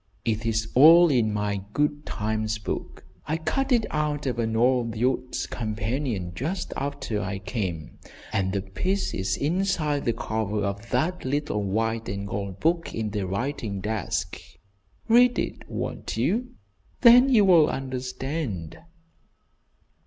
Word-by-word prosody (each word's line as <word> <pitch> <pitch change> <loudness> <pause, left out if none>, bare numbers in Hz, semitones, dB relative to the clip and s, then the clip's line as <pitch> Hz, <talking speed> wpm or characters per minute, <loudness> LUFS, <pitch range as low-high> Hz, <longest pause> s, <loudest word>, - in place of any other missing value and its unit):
"It 110 0 -1
is 110 -1 0
all 165 +6 +8
in 115 -5 +2
my 105 -1 -1 0.2
'Good 145 0 0
times 110 +1 -2
book.' 105 - -6 0.2
I 155 - 0
cut 270 - -1
it 235 -3 +4
out 150 -1 -1
of 125 -3 -2
an 115 -1 0
old 120 -1 +2
Youth's 125 +2 -1
Companion, 110 -3 -3
just 160 - -3
after 140 -7 -3
I 100 0 -3
came, 95 - -4 0.3
and 95 -1 +1
the 95 -1 -2
piece 185 - -2
is 95 0 -1
inside 155 -2 0
the 115 - +2
cover 110 -2 -2
of 100 +3 -4
that 180 +3 0
little 140 -5 -1
white 110 +2 -1
and 100 +1 -4
gold 100 -1 -4
book 165 +1 0
in 110 -2 -2
the 100 -3 -2
writing 105 0 -3
desk. 105 -1 -3 0.7
Read 245 +2 +5
it, - - -4
won't - - -4
you? 245 +4 0 0.5
Then 245 +2 +8
you 220 -6 +5
will 170 -5 +6
understand." 130 - -4
115 Hz, 140 wpm, -26 LUFS, 105-150 Hz, 0.7 s, all